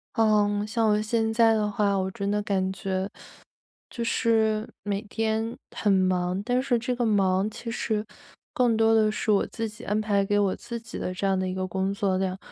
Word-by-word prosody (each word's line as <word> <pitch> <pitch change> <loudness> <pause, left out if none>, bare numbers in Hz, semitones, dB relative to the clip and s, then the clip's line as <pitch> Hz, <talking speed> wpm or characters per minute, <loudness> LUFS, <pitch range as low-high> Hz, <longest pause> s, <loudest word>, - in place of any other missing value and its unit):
嗯， 210 -2 +2
像 220 +1 +1
我 210 0 +3
现 220 +1 0
在 225 0 +4
的 210 -1 +1
话， 200 -1 +1
我 190 0 0
真 200 +1 -3
的 210 0 +1
感 190 -2 -1
觉 190 0 -2 0.8
就 235 - -4
是 220 -1 +1 0.2
每 205 0 -2
天 225 +1 -2 0.2
很 205 - +2
忙， 185 -1 +1
但 250 +2 +1
是 250 -3 +1
这 250 +2 -2
个 245 0 -1
忙 195 -2 +2
其 230 +1 -7
实 220 -2 -2 0.5
更 240 -3 +3
多 225 0 +4
的 215 -1 +4
是 215 0 0
我 200 - +3
自 225 -1 -4
己 215 +2 -12
安 210 +1 0
排 205 -2 +1
给 205 +1 +1
我 200 -2 +2
自 235 - -6
己 225 -1 -9
的 185 - -3
这 185 +2 -2
样 195 -1 +2
的 185 0 -1
一 - - -3
个 185 0 -2
工 190 +1 -1
作 195 -1 0
量。 190 0 -2
210 Hz, 225 characters per minute, -26 LUFS, 195-225 Hz, 0.8 s, 在